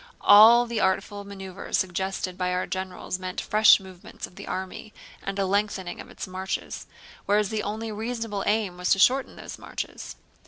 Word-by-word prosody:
All 225 +4 +8
the 235 -2 -3
artful 200 +1 0
maneuvers 195 -1 -4
suggested 190 0 -2
by 180 0 -1
our 180 - 0
generals 185 -1 -4
meant 185 0 -5
fresh 215 0 +6
movements 190 -2 -10
of - - -17
the - - -10
army 190 +3 -6 0.3
and 195 0 -4
a 195 - +1
lengthening 195 -2 -1
of - - -13
its - - -7
marches, 185 0 -5 0.4
whereas 205 0 +2
the 220 -1 -2
only 220 +2 -4
reasonable 225 -2 -3
aim 205 -4 0
was 180 0 -2
to - - 0
shorten 260 +7 +3
those - - -9
marches. - - -7
195 Hz, 170 wpm, -26 LUFS, 185-215 Hz, 0.4 s, All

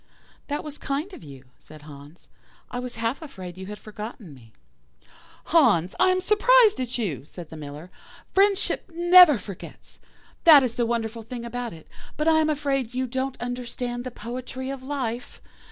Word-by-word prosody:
"'That 290 0 -3
was 295 -1 -9
kind 300 +7 -3
of - - -11
you,' 135 -3 -12 0.2
said 155 -1 -15
Hans; 145 +2 -13 0.4
'I 245 - -3
was 250 -1 -6
half 230 +5 -2
afraid 185 - -9
you 190 0 -8
had 210 0 -7
forgotten 215 -5 -9
me.' 115 -4 -17 0.9
"'Hans, 185 - +3
I 370 - +5
am 370 0 +2
surprised 430 - +5
at 255 -1 -3
you,' 175 - -3
said 165 +2 -11
the - - -8
Miller; 150 +3 -9 0.4
'friendship 395 -1 +2
never 345 -3 +7
forgets. 200 -3 -10 0.4
That 305 -5 +9
is 245 -3 -1
the 240 -1 0
wonderful 230 -1 -2
thing 235 +1 -7
about 245 0 -4
it, 160 -2 -13 0.3
but 305 - -1
I 320 -1 +5
am 310 0 +2
afraid 275 -5 -1
you 260 0 0
don't 260 +1 -3
understand 245 0 -4
the 255 - -5
poetry 255 +3 -6
of 275 -1 -6
life. 260 -3 -4
245 Hz, 170 wpm, -25 LUFS, 200-290 Hz, 0.9 s, That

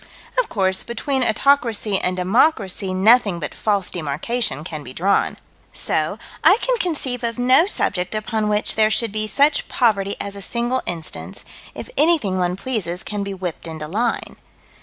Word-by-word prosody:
Of - - 0
course 190 -2 +1
between 260 +3 -2
autocracy 225 -4 +2
and 185 0 -1
democracy 195 - +1
nothing 200 0 +4
but 150 - -5
false 200 -3 -1
demarcation 155 - -3
can 155 -3 -6
be 130 -2 -10
drawn. 195 +7 +1 0.3
So - - +1 0.3
I 385 - +6
can - - +1
conceive 270 - +2
of 230 0 -2
no 255 +8 +4
subject 195 - 0
upon 215 0 -1
which 210 0 +1
there 215 0 +3
should 220 0 0
be 215 +1 -2
such 285 +7 +2
poverty 200 -5 +1
as 200 0 -5
a 200 - -8
single 240 +5 -1
instance, 165 -3 -5 0.3
if - - -7
anything 290 - +2
one 180 0 0
pleases 195 -5 -3
can 210 -1 -4
be 200 -1 -5
whipped 180 -3 -6
into 160 -2 -6
line. 225 +8 -2
210 Hz, 160 wpm, -20 LUFS, 185-245 Hz, 0.3 s, I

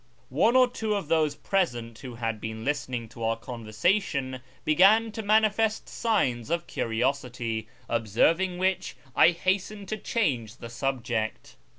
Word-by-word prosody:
One 195 - +3
or 255 -1 +7
two 220 -3 -2
of 195 -7 -4
those 155 -3 +2
present 120 - -1
who 130 -3 -8
had 115 -2 -3
been 110 0 -5
listening 130 -5 -2
to 115 - -8
our 115 0 +1
conversation 130 - -1 0.2
began 200 +8 +5
to 220 - -5
manifest 215 +1 +2
signs 130 - 0
of 170 +1 -1
curiosity, 120 -2 -2 0.2
observ 115 - +2
ing 185 -2 -1
which 185 +1 0 0.2
I - - +7
hastened 190 +3 -1
to 215 - -2
change 130 - -1
the 115 - -9
subject. 120 -2 -3
140 Hz, 145 wpm, -27 LUFS, 115-195 Hz, 0.2 s, or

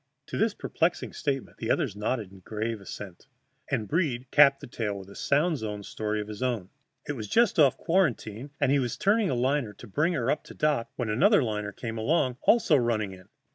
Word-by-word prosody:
To - - -5
this 220 0 +2
perplexing 165 +2 -1
statement 135 -3 -3
the 115 - -4
others 120 -7 +1
nodded 105 -3 -3
grave 110 +1 -3
assent, 95 -2 -9 0.4
and 110 - -1
Breed 135 - -1
capped 140 -2 +6
the - - -9
tale 105 -4 -3
with 95 0 -10
a - - -12
sound 150 +2 +1
zone 105 -2 -5
story 105 +1 -3
of 105 - -4
his 105 -1 -8
own. 115 -7 -1 0.4
It 145 - -1
was 110 -6 -6
just 230 - +3
off 140 -4 +5
quarantine, 140 - 0
and 140 -2 +2
he 140 - +4
was 125 -3 -2
turning 210 +1 +2
a 130 - 0
liner 130 -2 0
to 105 - -12
bring 150 - +1
her 130 -5 +1
up - - -1
to - - -11
dock 150 -6 +1
when 120 -4 -2
another 185 - +4
liner 105 -3 -2
came 115 +1 -5
along, 130 0 +1
also 220 -10 +4
running 115 -5 0
in. 95 -1 -13
120 Hz, 210 wpm, -28 LUFS, 105-150 Hz, 0.4 s, capped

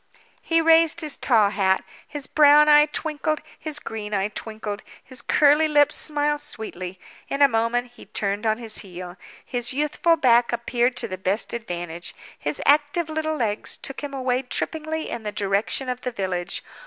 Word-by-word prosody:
He 330 0 +2
raised 330 0 +5
his 305 -2 +1
tall 220 -6 +3
hat. 190 -2 +1 0.2
His 290 -2 -5
brown 300 +1 +6
eye 295 0 +7
twinkled, 310 0 -2 0.2
his 310 -2 -4
green 215 -6 -5
eye 195 +1 0
twinkled, 215 -1 -6 0.2
his 255 -2 -9
curly 300 +1 +4
lips 295 -1 +4
smiled 295 -1 0
sweetly. 190 -10 -6 0.3
In 280 +1 +2
a - - +8
moment 240 +1 0
he - - -15
turned 205 +2 -2
on 220 0 +2
his 225 -2 -1
heel. 180 -2 -8 0.3
His 245 0 -2
youthful 300 +4 +2
back 240 -4 +4
appeared 240 +1 0
to - - 0
the 185 0 -6
best 190 +3 -1
advantage; 175 -6 -5 0.2
his 145 0 -4
active 295 +3 +3
little 315 0 -2
legs 225 -6 -2
took 270 - -7
him 290 -1 -5
away 255 -2 -1
trippingly 315 +4 -3
in 235 - -5
the 210 -1 -4
direction 205 +6 -1
of 250 0 -3
the 250 - -3
village. 185 -5 -3
245 Hz, 170 wpm, -23 LUFS, 210-295 Hz, 0.3 s, a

